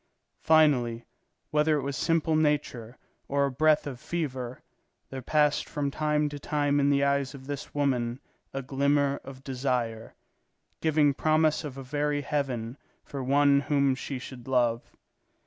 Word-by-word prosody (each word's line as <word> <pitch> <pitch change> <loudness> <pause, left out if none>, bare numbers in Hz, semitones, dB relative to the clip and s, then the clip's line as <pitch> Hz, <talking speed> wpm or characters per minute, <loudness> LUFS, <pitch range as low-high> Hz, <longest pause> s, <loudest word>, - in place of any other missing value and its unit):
Finally, 130 -7 +3 0.5
whether 150 0 +3
it 140 - -3
was 140 0 -3
simple 160 +1 +1
nature 145 -6 0 0.3
or 140 0 +1
a 140 - -2
breath 155 +3 +3
of 135 -4 -6
fever, 130 -8 -4 0.5
there 135 -1 -5
passed 150 +2 +1
from 140 -1 -2
time 150 0 0
to 145 0 -6
time 145 -1 0
in 140 0 +3
the 140 0 +3
eyes 140 -1 0
of 130 -1 -11
this 145 0 -6
woman 125 -4 0 0.3
a 135 - -4
glimmer 140 +1 +1
of 135 -1 -11
desire, 125 -4 -2 0.7
giving 150 -2 +3
promise 155 +2 +2
of 140 -3 -7
a 135 - -6
very 145 +2 -1
heaven 135 -4 -3 0.2
for 140 -2 -6
one 140 +1 +4
whom 140 -2 +2
she 130 +1 -5
should 125 -1 -10
love. 120 -3 +1
140 Hz, 150 wpm, -28 LUFS, 130-150 Hz, 0.7 s, one